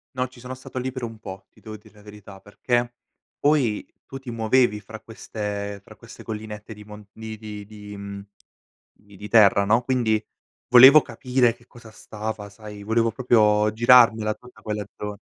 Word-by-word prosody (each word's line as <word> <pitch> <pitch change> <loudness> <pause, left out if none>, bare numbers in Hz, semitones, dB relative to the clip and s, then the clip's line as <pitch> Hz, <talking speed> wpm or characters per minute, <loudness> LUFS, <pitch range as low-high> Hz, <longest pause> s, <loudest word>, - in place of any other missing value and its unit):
No, 125 0 -1
ci 125 0 -17
sono 125 +1 -8
stato 130 0 -8
li 130 +1 -3
per 130 -1 -6
un 115 -1 -7
po', 95 -2 -10
ti - - -24
devo 110 -1 -9
dire 110 0 -21
la 105 - -18
verità 105 -1 -13
perché 120 +4 -2 0.4
poi 140 -8 +1 0.2
tu 135 - -9
ti 135 -2 -9
muovevi 115 -1 +2
fra 110 +2 -11
queste 105 -2 -6
fra - - -16
queste - - -14
collinette 105 0 -7
di 105 0 -13
mon 105 0 -12
di 110 0 -9
di 105 -1 -8
di, 105 0 -11
mhmm, 100 0 -8 0.7
di 100 -1 -20
di 105 +1 -8
terra, 100 -3 +5
no, 115 +4 +3
quindi 120 -4 0 0.4
volevo 130 +5 +9
capire 125 0 0
che 120 0 -24
cosa 120 -2 -15
stava 110 -1 -7
sai 105 0 -11
volevo 115 +2 +1
proprio 105 -3 +3
girarmela 115 -2 +5
tutta, 125 +3 -16
quella 105 -2 -4
zona. 105 0 -6
110 Hz, 180 wpm, -23 LUFS, 105-120 Hz, 0.7 s, volevo